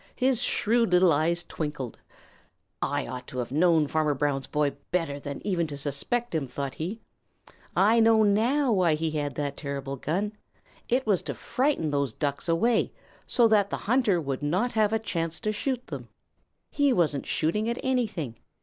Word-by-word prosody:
His 255 -2 +2
shrewd 230 -1 +2
little 180 -2 +6
eyes 170 +4 +1
twinkled. 150 -8 -5 0.8
"I - - 0
ought 125 0 -7
to 130 - -8
have 125 -1 -3
known 160 +1 +4
Farmer 150 0 +1
Brown's 135 -1 -1
boy 150 -1 +1 0.2
better 165 -5 -1
than 140 +3 -7
even 175 -5 0
to 145 -2 -6
suspect 150 - -2
him," 155 -4 -1
thought 140 +1 -4
he. 190 +8 -5 0.7
"I 220 +4 +5
know 225 -1 +5
now 240 +7 +3
why 180 -6 +3
he 160 +1 -1
had 145 -3 -2
that 145 -1 -2
terrible 140 -1 -5
gun. 190 +10 -2 0.6
It 255 +2 +2
was 200 -5 +2
to - - -5
frighten 255 - 0
those 140 -5 0
Ducks 140 +5 -2
away 220 +8 +2 0.4
so 240 -3 +4
that 205 -2 +3
the - - -2
hunter 220 -5 +2
would 140 -4 -3
not 185 +12 0
have 215 -2 +2
a 225 - +2
chance 165 -7 -3
to 215 -2 0
shoot 250 +3 -2
them. - - -7 0.6
He 285 -1 +3
wasn't 160 - +1
shooting 210 +8 0
at 235 - -1
anything. 215 - -1
170 Hz, 175 wpm, -27 LUFS, 145-220 Hz, 0.8 s, little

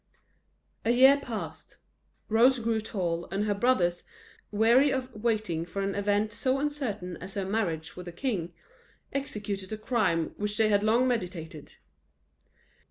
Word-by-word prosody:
A - - 0
year 265 +4 +7
passed: 235 -6 -7 0.5
Rose 240 +4 +5
grew 230 -1 0
tall, 175 -6 -2
and 195 +3 -1
her 210 - +1
brothers, 195 -6 +2 0.5
weary 235 +7 +4
of 260 -1 -3
waiting 215 -7 -1
for 195 +3 -4
an 195 0 -1
event 205 +2 0
so 260 +5 0
uncertain 265 - -3
as 190 +2 -9
her 195 -2 -1
marriage 175 -6 -2
with 180 0 -9
a - - -5
king, 180 -4 -2 0.6
executed 205 -8 -4
a 215 - -3
crime 210 -8 +1
which 210 0 -2
they 220 -1 +4
had 205 -1 +3
long 230 +4 +3
meditated. 175 - -4
210 Hz, 145 wpm, -28 LUFS, 185-240 Hz, 0.6 s, year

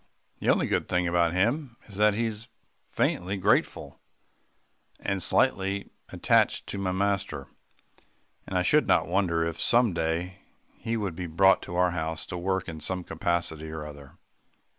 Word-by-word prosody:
The - - -1
only - - +3
good - - -1
thing 90 -1 +1
about 85 -1 +2
him 120 - 0
is 100 - -12
that 105 0 +4
he 115 +2 0
is 110 0 -5 0.3
faintly 95 +3 -1
grateful, 95 - 0 1.0
and 95 -1 -2
slightly 95 +3 +1 0.2
attached - - +2
to 100 - -4
my 95 -1 -1
master, 100 -6 -1 1.0
and 95 - -2
I 90 - +2
should 150 +6 +3
not - - +3
wonder 85 -3 +1
if 85 0 -4
some 120 -4 +3
day 85 +3 -2 0.3
he 115 0 -3
would 100 -6 -3
be 90 +1 -5
brought 95 +4 +4
to 85 - -7
our 90 0 +3
house 80 -1 -3
to - - -3
work 95 +1 -1
in 80 -2 -6
some 90 +4 -3
capacity 80 -2 -2
or 80 -1 -6
other. 70 -2 -12
90 Hz, 160 wpm, -27 LUFS, 85-100 Hz, 1.0 s, that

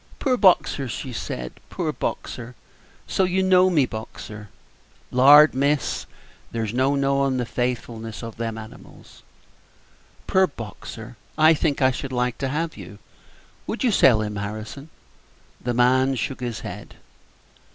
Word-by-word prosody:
"Poor 260 -3 +1
Boxer!" 180 - +3
she 125 +2 -6
said, 60 - -6
"poor - - -2
Boxer! 120 +1 -5 0.5
so 190 - 0
you 185 +1 +1
know 185 0 +5
me, 155 -7 +3
Boxer!" 110 -2 -8 0.6
"Lord, 145 +4 +8
miss, 140 +2 0 0.4
there's 110 -2 -3
no 130 +3 +2
knowin' 140 -1 +1
the 125 - -1
faithfulness 115 -2 -4
of 115 -1 -8
them 115 -1 -3
animals." 110 0 -13 1.0
"Poor 190 0 +3
Boxer! 115 - -9 0.2
I 155 +1 +6
think 145 -3 0
I 130 - +5
should 130 +1 -5
like 125 -1 -1
to 135 - -1
have 160 +4 -2
you. - - -10 0.7
Would - - -3
you 245 - +3
sell 120 - +5
him, 105 -1 -4
Harrison?" 110 +8 -6 0.7
The 120 -1 -1
man 130 +2 +3
shook 130 +2 -3
his 120 -3 -4
head. - - -8
130 Hz, 140 wpm, -23 LUFS, 115-145 Hz, 1.0 s, Lord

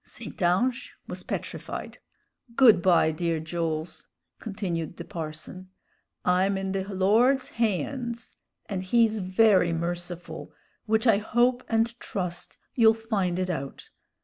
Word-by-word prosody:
St. - - -10
Ange 235 +9 +1
was - - -6
petrified. - - -5 0.6
"Good 235 -8 +7
by, 170 -3 +4
dear 165 0 -1
Jools," 160 0 -4 0.3
continued 180 -7 -4
the - - -7
parson. 165 +3 -7 0.6
"I'm 190 +2 +2
in 190 0 -3
the 190 0 -2
Lord's 215 +8 +2
haynds, 235 +2 -2 0.3
and 195 -3 -3
he's 220 +3 +2
very 190 -1 +4
merciful, 175 0 -5 0.3
which 220 +2 +2
I 220 -4 +5
hope 245 +3 +2
and 230 +1 +1
trust 180 -4 -4 0.2
you'll 225 -2 +5
find 205 -6 -1
it 185 0 -1
out. 140 -5 -6
190 Hz, 120 wpm, -27 LUFS, 175-225 Hz, 0.6 s, Good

